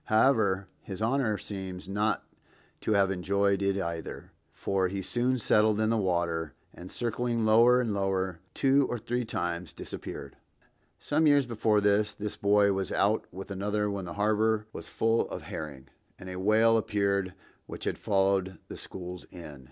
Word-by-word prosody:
However, 110 Hz, -5 st, +3 dB
his 95 Hz, -2 st, -7 dB
Honor 115 Hz, -1 st, +1 dB
seems 95 Hz, -3 st, -7 dB
not 105 Hz, +2 st, 0 dB, 0.5 s
to 110 Hz, -, 0 dB
have 100 Hz, -1 st, +3 dB
enjoyed 100 Hz, +1 st, +1 dB
it 100 Hz, 0 st, +1 dB
either, 85 Hz, -3 st, -5 dB, 0.2 s
for 95 Hz, -1 st, 0 dB
he 95 Hz, +1 st, -4 dB
soon 125 Hz, +6 st, 0 dB
settled 110 Hz, -2 st, +3 dB
in 110 Hz, 0 st, +2 dB
the -, -, +2 dB
water, 85 Hz, -5 st, -1 dB, 0.2 s
and 90 Hz, +1 st, -10 dB
circling 120 Hz, -1 st, -1 dB
lower 115 Hz, +3 st, +6 dB
and 115 Hz, -4 st, 0 dB
lower 95 Hz, -3 st, -1 dB, 0.2 s
two 135 Hz, 0 st, +3 dB
or 120 Hz, -, -1 dB
three 120 Hz, +2 st, -2 dB
times, 85 Hz, -5 st, -3 dB
disappeared. -, -, -8 dB, 0.6 s
Some 155 Hz, +2 st, +2 dB
years 145 Hz, -2 st, +5 dB
before 110 Hz, -3 st, +1 dB
that, 105 Hz, +1 st, +2 dB
this 105 Hz, 0 st, -4 dB
boy 100 Hz, 0 st, +3 dB
was 95 Hz, 0 st, -2 dB
out 105 Hz, +3 st, +1 dB
with 95 Hz, +2 st, -8 dB
another 105 Hz, +2 st, -1 dB
when 100 Hz, -2 st, -4 dB
the 85 Hz, -, -6 dB
harbor 110 Hz, +1 st, +2 dB
was -, -, -8 dB
full 115 Hz, +1 st, +1 dB
of -, -, -6 dB
herring, 70 Hz, -4 st, -7 dB, 0.3 s
and 95 Hz, 0 st, -8 dB
a 90 Hz, -, -5 dB
whale 110 Hz, +3 st, +4 dB
appeared 100 Hz, -3 st, 0 dB, 0.3 s
which -, -, -7 dB
had -, -, -2 dB
followed 95 Hz, -2 st, +1 dB
the -, -, -7 dB
schools 90 Hz, -1 st, -8 dB
in. 75 Hz, -6 st, -11 dB
100 Hz, 165 wpm, -29 LUFS, 95-110 Hz, 0.6 s, lower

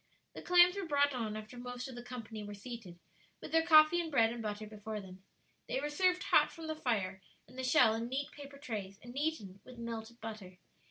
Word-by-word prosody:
The -, -, -8 dB
clams 355 Hz, +1 st, +6 dB
were 395 Hz, -3 st, -3 dB
brought 285 Hz, -1 st, +3 dB
on 220 Hz, -4 st, -3 dB
after 215 Hz, +3 st, -9 dB
the -, -, -7 dB
most 245 Hz, 0 st, -5 dB
of 260 Hz, -, -8 dB
the 240 Hz, -, -7 dB
company 235 Hz, -3 st, -7 dB
were 205 Hz, 0 st, -7 dB
seated, 215 Hz, -5 st, -9 dB, 0.4 s
with -, -, -9 dB
their 325 Hz, -, +5 dB
coffee 320 Hz, +1 st, +7 dB
and 330 Hz, -, -4 dB
bread 230 Hz, -6 st, +3 dB
and 240 Hz, -, -6 dB
butter 210 Hz, 0 st, -4 dB
before 215 Hz, 0 st, -6 dB
them. 190 Hz, -1 st, -12 dB, 0.4 s
They -, -, -1 dB
were 295 Hz, +2 st, -3 dB
served 365 Hz, +3 st, +2 dB
hot -, -, +4 dB
from 330 Hz, -, -9 dB
the 315 Hz, 0 st, -3 dB
fire 200 Hz, -10 st, -1 dB, 0.3 s
and 250 Hz, -, -16 dB
the 260 Hz, -, -4 dB
shell, 250 Hz, -3 st, +5 dB
in 230 Hz, +1 st, -2 dB
neat 275 Hz, +2 st, -2 dB
paper 280 Hz, -1 st, -11 dB
trays, 210 Hz, -8 st, -5 dB
and 240 Hz, +1 st, -10 dB
eaten 275 Hz, -11 st, -2 dB
with 255 Hz, -1 st, -13 dB
melted 230 Hz, 0 st, -6 dB
butter. 215 Hz, -5 st, -8 dB
240 Hz, 225 wpm, -34 LUFS, 215-285 Hz, 0.4 s, coffee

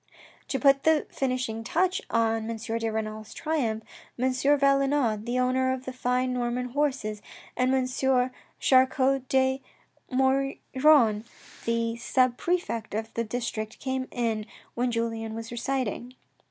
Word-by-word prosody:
To 270 Hz, -, -1 dB
put 275 Hz, -1 st, +5 dB
the 315 Hz, 0 st, +3 dB
finishing 255 Hz, -4 st, -2 dB
touch 370 Hz, +9 st, +1 dB
on 225 Hz, -1 st, +1 dB
M. 230 Hz, -, -3 dB
de 225 Hz, 0 st, -2 dB
Renal's 215 Hz, 0 st, -4 dB
triumph, 245 Hz, -9 st, -1 dB, 0.3 s
M. 260 Hz, +2 st, +1 dB
Valenod, 275 Hz, -4 st, +2 dB
the 245 Hz, +1 st, 0 dB
owner 255 Hz, +1 st, +2 dB
of 260 Hz, 0 st, -4 dB
the 260 Hz, -, -5 dB
fine 250 Hz, 0 st, 0 dB
Norman 250 Hz, 0 st, -1 dB
horses, 255 Hz, -6 st, -1 dB, 0.3 s
and 255 Hz, +1 st, +2 dB
M. 265 Hz, -1 st, +2 dB, 0.7 s
Char 260 Hz, -1 st, +5 dB
cot 265 Hz, -1 st, 0 dB
de 265 Hz, 0 st, +2 dB, 0.5 s
Maugiron, 265 Hz, -2 st, +3 dB, 0.4 s
the 230 Hz, 0 st, 0 dB
sub 255 Hz, +1 st, +2 dB
prefect 245 Hz, -, -2 dB
of 220 Hz, +1 st, -4 dB
the 230 Hz, -, -1 dB
district 220 Hz, -2 st, -4 dB
came 260 Hz, -1 st, -3 dB
in 225 Hz, -3 st, -2 dB, 0.3 s
when 245 Hz, +1 st, 0 dB
Julien 225 Hz, -1 st, -2 dB
was 225 Hz, 0 st, -6 dB
reciting. 245 Hz, 0 st, -3 dB
250 Hz, 135 wpm, -27 LUFS, 230-265 Hz, 0.7 s, put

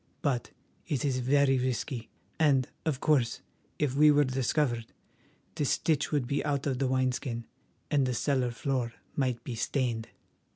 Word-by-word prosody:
But 130 Hz, -6 st, 0 dB, 0.4 s
it 140 Hz, -1 st, -1 dB
is 130 Hz, -2 st, +1 dB
very 135 Hz, +1 st, +3 dB
risky, 125 Hz, -1 st, -2 dB, 0.3 s
and, 140 Hz, -5 st, +4 dB, 0.2 s
of 140 Hz, -5 st, 0 dB
course, 135 Hz, -7 st, +2 dB, 0.4 s
if 145 Hz, -4 st, 0 dB
we 150 Hz, +2 st, +6 dB
were 145 Hz, 0 st, +5 dB
discovered—the 130 Hz, 0 st, -3 dB
stitch 150 Hz, +2 st, +1 dB
would 145 Hz, -4 st, +1 dB
be 140 Hz, +4 st, -1 dB
out 145 Hz, -2 st, -1 dB
of 130 Hz, -3 st, -1 dB
the 135 Hz, -, +2 dB
wineskin, 130 Hz, -2 st, -1 dB, 0.5 s
and 140 Hz, -3 st, +3 dB
the 125 Hz, -, -1 dB
cellar 130 Hz, -1 st, +1 dB
floor 120 Hz, 0 st, -2 dB, 0.2 s
might 125 Hz, -4 st, 0 dB
be 125 Hz, -, -5 dB
stained!" 115 Hz, -1 st, -1 dB
130 Hz, 150 wpm, -30 LUFS, 125-145 Hz, 0.5 s, we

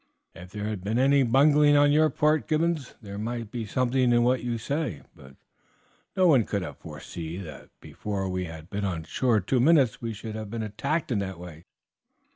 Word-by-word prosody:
"If 90 Hz, -, -12 dB
there 105 Hz, +2 st, -6 dB
had 105 Hz, -4 st, -4 dB
been 105 Hz, +4 st, -1 dB
any 140 Hz, +2 st, +4 dB
bungling 145 Hz, +4 st, +5 dB
on 145 Hz, 0 st, +5 dB
your 155 Hz, +1 st, +4 dB
part, 155 Hz, 0 st, +1 dB
Gibbons, 155 Hz, -3 st, -1 dB
there 100 Hz, 0 st, -7 dB
might 115 Hz, 0 st, -4 dB
be 115 Hz, -3 st, -4 dB
something 125 Hz, +1 st, +1 dB
in 120 Hz, 0 st, +4 dB
what 125 Hz, +1 st, +1 dB
you 120 Hz, -1 st, -2 dB
say, 125 Hz, -, -3 dB
but 65 Hz, 0 st, -15 dB, 0.8 s
no 185 Hz, -, +4 dB
one 140 Hz, -9 st, +5 dB
could 100 Hz, -2 st, -3 dB
have 75 Hz, -6 st, -8 dB
foreseen 85 Hz, +3 st, -7 dB
that 75 Hz, -4 st, -11 dB
before 100 Hz, -2 st, -5 dB
we 90 Hz, 0 st, -2 dB
had 80 Hz, -1 st, -9 dB
been 100 Hz, +2 st, -4 dB
on 90 Hz, -5 st, -2 dB
shore 110 Hz, +7 st, +1 dB
two 125 Hz, +8 st, 0 dB
minutes 135 Hz, -3 st, +3 dB
we 115 Hz, -1 st, -3 dB
should 110 Hz, 0 st, -7 dB
have 110 Hz, -1 st, -6 dB
been 115 Hz, 0 st, -4 dB
attacked 110 Hz, +10 st, -2 dB
in 110 Hz, -, +1 dB
that 95 Hz, -2 st, -4 dB
way. 85 Hz, -2 st, -11 dB
115 Hz, 200 wpm, -26 LUFS, 95-135 Hz, 0.8 s, bungling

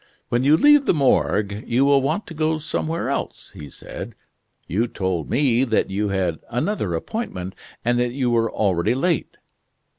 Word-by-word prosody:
"When 120 Hz, +1 st, +1 dB
you 145 Hz, +3 st, +5 dB
leave 295 Hz, -, +5 dB
the -, -, +3 dB
Morgue 105 Hz, -7 st, +1 dB
you 125 Hz, +4 st, +2 dB
will 140 Hz, -1 st, +4 dB
want 155 Hz, +10 st, -1 dB
to -, -, -9 dB
go 155 Hz, 0 st, 0 dB
somewhere 160 Hz, +1 st, -2 dB
else," -, -, -4 dB
he 75 Hz, -1 st, -9 dB
said, -, -, -9 dB, 0.5 s
"you 110 Hz, +8 st, 0 dB
told 95 Hz, -7 st, -3 dB
me 130 Hz, -3 st, +2 dB
that 115 Hz, -6 st, 0 dB
you 105 Hz, +1 st, -1 dB
had 95 Hz, -5 st, -1 dB
another 120 Hz, -, -1 dB
appointment, 95 Hz, -, -4 dB, 0.3 s
and 120 Hz, 0 st, +2 dB
that 120 Hz, 0 st, +1 dB
you 125 Hz, -1 st, -1 dB
were 115 Hz, -1 st, +1 dB
already 100 Hz, +2 st, +1 dB
late." 165 Hz, +4 st, -1 dB
120 Hz, 170 wpm, -22 LUFS, 100-150 Hz, 0.5 s, you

